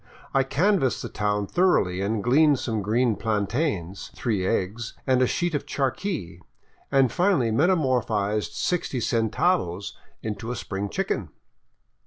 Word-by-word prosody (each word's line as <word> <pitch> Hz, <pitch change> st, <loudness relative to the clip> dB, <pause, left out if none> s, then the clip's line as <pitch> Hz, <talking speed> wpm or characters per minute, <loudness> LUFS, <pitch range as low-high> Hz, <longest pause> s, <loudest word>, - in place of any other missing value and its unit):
I 135 Hz, -, +4 dB
canvassed 145 Hz, -, +1 dB
the -, -, -5 dB
town 105 Hz, -1 st, -1 dB
thoroughly 95 Hz, -, +2 dB
and 105 Hz, +1 st, -1 dB
gleaned 145 Hz, +3 st, +4 dB
some 110 Hz, -3 st, -2 dB
green 115 Hz, +3 st, +1 dB
plantains, 105 Hz, -, -2 dB
three 105 Hz, -6 st, -1 dB
eggs, 110 Hz, +3 st, -2 dB
and 130 Hz, -1 st, +3 dB
a 130 Hz, -, +4 dB
sheet 175 Hz, +4 st, -1 dB
of 145 Hz, -, -2 dB
charqui, 135 Hz, -, -2 dB, 0.5 s
and 135 Hz, -3 st, +4 dB
finally 175 Hz, -, +2 dB
metamorphized 120 Hz, -, +1 dB
sixty 170 Hz, -7 st, -1 dB
centavos 115 Hz, -, 0 dB, 0.3 s
into 110 Hz, +1 st, -4 dB
a 125 Hz, -, -2 dB
spring 100 Hz, -2 st, -4 dB
chicken. -, -, -2 dB
120 Hz, 130 wpm, -25 LUFS, 105-140 Hz, 0.5 s, I